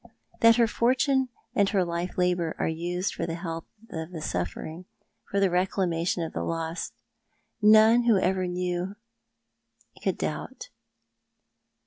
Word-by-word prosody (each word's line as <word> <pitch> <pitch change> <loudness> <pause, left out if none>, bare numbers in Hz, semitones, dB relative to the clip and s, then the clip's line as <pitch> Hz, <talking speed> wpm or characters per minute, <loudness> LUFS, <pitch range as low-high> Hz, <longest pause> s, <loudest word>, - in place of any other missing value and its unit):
That 230 0 +7
her 235 0 +5
fortune 260 +4 +2 0.2
and 200 -5 +3
her 190 -4 +2
life 170 +1 -3
labour 180 -2 +1
are - - 0
used 175 +3 -2
for - - -3
the 165 - -3
help 165 -1 -5 0.2
of 160 0 -5
the 170 - -6
suffering, 155 - -4 0.4
for 200 - 0
the 195 -2 +3
reclamation 180 -2 0
of 165 - -5
the - - -2
lost, 165 +1 -3 0.7
none 220 +3 +6
who 230 -4 +5
ever 185 0 +1
knew 180 0 -1
her 230 +2 -31
could - - 0
doubt. 485 +2 -5
180 Hz, 140 wpm, -27 LUFS, 170-215 Hz, 0.7 s, That